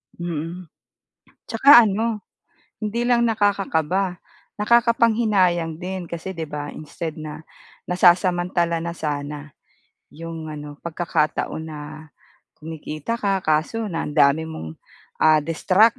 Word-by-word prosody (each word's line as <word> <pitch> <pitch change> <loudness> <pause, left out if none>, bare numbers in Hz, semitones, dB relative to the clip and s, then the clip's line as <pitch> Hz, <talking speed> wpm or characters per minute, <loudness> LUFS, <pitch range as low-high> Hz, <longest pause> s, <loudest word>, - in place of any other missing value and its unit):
Mm. 170 +1 -5 0.7
Tsaka 240 +1 +7
ano 215 +1 -1 0.6
hindi 215 +3 -1
lang 240 -1 +3
nakakakaba, 195 -4 0 0.4
nakakapanghinayang 215 -7 +3
din 185 0 -5
kasi 170 +3 -5
'di 165 -4 -5
ba, 145 0 -5
instead 155 +1 -6
na 155 +1 -7 0.4
nasasamantala 175 -1 +3
na 170 +1 -4
sana 145 -1 -4 0.6
'yong 165 0 -7
ano 150 -1 -8
pagkakataon 160 -2 -1
na 155 -1 -7 0.8
kumikita 155 +6 -5
ka, 195 -3 0
kaso 160 +8 0
na 165 -1 -3
ang 150 - -6
dami 150 +1 +4
mong, 80 - -8 0.4
ah, 155 -1 +5
distract 190 - +3
170 Hz, 110 wpm, -22 LUFS, 155-205 Hz, 0.8 s, Tsaka